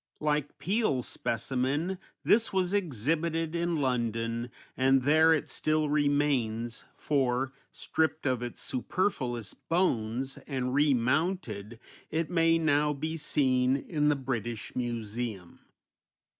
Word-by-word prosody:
Like 150 -1 -1
Peale's 160 - 0
specimen 135 +10 -1 0.2
this 225 +1 +4
was 185 -1 0
exhibited 165 - 0
in 170 0 0
London, 115 -3 -1 0.3
and 135 0 +3
there 155 +3 +5
it 160 - +2
still 155 -1 0
remains, 140 -6 +1
for, 135 -2 0 0.2
stripped 160 -1 -1
of 130 -3 +1
its 120 -1 -5
superfluous 125 - -1
bones, 130 -7 -1
and 130 -3 -2
remounted, 130 - +1 0.3
it 160 +2 -1
may 165 -1 +4
now 150 -2 +2
be 155 +3 -3
seen 130 -4 +2
in 150 0 0
the 150 - +3
British 120 -5 -4
Museum. 115 -5 -4
140 Hz, 110 wpm, -29 LUFS, 120-160 Hz, 0.3 s, there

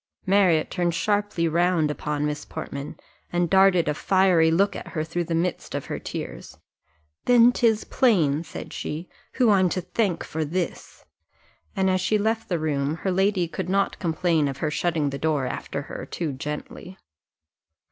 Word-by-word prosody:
Marriott 185 -5 +3
turned 175 -2 0
sharply 205 -5 0
round 170 -1 +2
upon 150 0 -2
Miss 150 0 -3
Portman, 140 +1 -7 0.3
and 175 -1 0
darted 190 -3 +5
a 150 - +2
fiery 180 -1 +3
look 195 +5 +2
at - - -7
her 155 -3 -3
through 170 +2 -3
the 165 - -2
midst 175 +2 -2
of - - -3
her - - -4
tears. - - -7 0.7
"Then 245 0 +6
'tis 225 -3 +2
plain," 165 - +2
said - - -8
she, 160 +4 -5 0.2
"who 245 -4 +3
I'm 190 -3 +4
to 185 - -2
thank 185 0 -1
for 160 0 -3
this;" 175 +4 -4 0.7
and 190 -1 +1
as 185 0 +2
she 215 - +2
left 220 +2 -1
the 175 - +1
room 150 -2 -1
her 190 - +2
lady 190 -1 +1
could 180 +2 -5
not 195 +1 0
complain 165 -3 +1
of 135 -1 -4
her 150 +2 -2
shutting 155 -3 0
the 140 - -5
door 155 -4 0
after 125 - -4
her - - -8
too 160 -5 -3
gently. 150 +6 -7
175 Hz, 170 wpm, -24 LUFS, 155-195 Hz, 0.7 s, Then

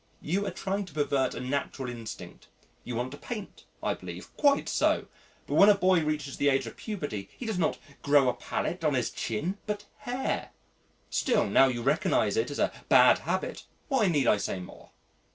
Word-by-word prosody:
You 195 +6 0
are - - -2
trying 195 +1 -2
to 165 -5 -15
pervert 140 -3 +1
a - - -4
natural 130 0 -3
instinct. 115 -2 -8 0.4
You 120 - -5
want 125 +2 -2
to 145 - -9
paint, 215 -5 -7 0.2
I - - +1
believe. - - -9
Quite 285 -1 +3
so. - - +2 0.4
But - - -5
when 200 - +7
a 205 - +7
boy 185 -3 +3
reaches 150 -2 -2
the 145 - +3
age 135 -1 +2
of - - -8
puberty 145 - -5
he 250 - -6
does 220 -5 -2
not 160 - +1 0.2
grow 140 -2 +4
a 125 - +3
palette 175 0 -3
on 150 -3 +2
his 125 -3 0
chin 165 - -3
but 205 -1 -3
hair.... 250 +2 -3 0.6
Still, 255 - +2
now 110 +6 +5
you 120 -2 -2
recognise 135 - +2
it 445 - +1
as - - -5
a - - +2 0.2
bad - - +7
habit, - - -2 0.2
why 265 -8 +3
need 145 -7 +2
I 105 - +4
say 100 -1 -3
more?" 90 - -11
150 Hz, 195 wpm, -28 LUFS, 130-200 Hz, 0.6 s, when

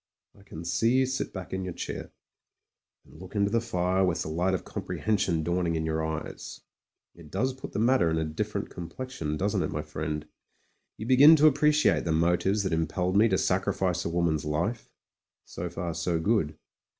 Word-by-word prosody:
I - - -19
can 85 -4 -9
see 115 +7 +2
you 130 - +4
sit 130 +1 -3
back 95 -1 -7
in 95 0 -2
your 90 -2 -5
chair, - - -5 1.0
and 80 - -16
look 95 +3 -11
into 100 0 +2
the 115 0 +2
fire 95 -4 0
with 90 -2 0
the - - -5
light 90 +4 +1
of - - -5
comprehension 95 -7 -1
dawning 85 0 0
in 80 0 -1
your 80 0 -1
eyes; 80 0 -5 0.5
it 85 -3 -14
does 125 - -1
put 130 - -9
the - - -3
matter 115 -5 +3
in 80 - 0
a 80 - 0
different 80 0 -3
com 85 -2 -7
plexion, 85 - -4
doesn't 100 +2 0
it, - - -1
my 75 - -3
friend? 75 0 -4 0.7
You 110 - -6
begin 135 +6 +8
to 155 0 +6
appre 150 +2 +3
ciate 150 0 +3
the 85 - 0
motives 90 +5 +2
that 95 - -1
impelled 90 +3 0
me 110 +3 +6
to 95 - +2
sacrifice 95 -2 0
a - - -2
wom 85 0 +1
an's 80 -2 0
life; 85 +10 -2 0.6
so - - -5
far 85 -1 -4
so 85 +1 -1
good. 80 -5 0
90 Hz, 200 wpm, -28 LUFS, 80-105 Hz, 1.0 s, begin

